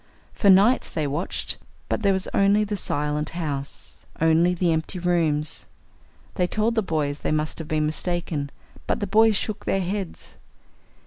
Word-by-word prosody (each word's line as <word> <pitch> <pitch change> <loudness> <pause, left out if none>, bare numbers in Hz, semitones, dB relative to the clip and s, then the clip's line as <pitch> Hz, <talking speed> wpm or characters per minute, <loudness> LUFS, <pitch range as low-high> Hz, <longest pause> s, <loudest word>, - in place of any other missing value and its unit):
For 200 - +2
nights 200 +7 +5
they 155 - -2
watched. 145 +6 -3 0.3
But - - -1
there 200 -2 +3
was 190 -1 -1
only 200 +2 +4
the 210 0 -2
silent 150 -4 -1
house. 140 -5 -2
Only 165 +3 +3
the 175 -1 +1
empty 160 +4 -1
rooms. 165 -4 0 0.7
They 180 - +1
told 215 +4 +1
the 225 - +2
boys 150 -6 -1
they - - -2
must 155 +1 -1
have 160 - -6
been 155 -1 0
mistaken. 155 -2 -1 0.4
But - - 0
the 205 - -1
boys 220 +2 +4
shook 210 +1 -2
their 195 - +1
heads. 190 0 -5
175 Hz, 165 wpm, -24 LUFS, 155-200 Hz, 0.7 s, nights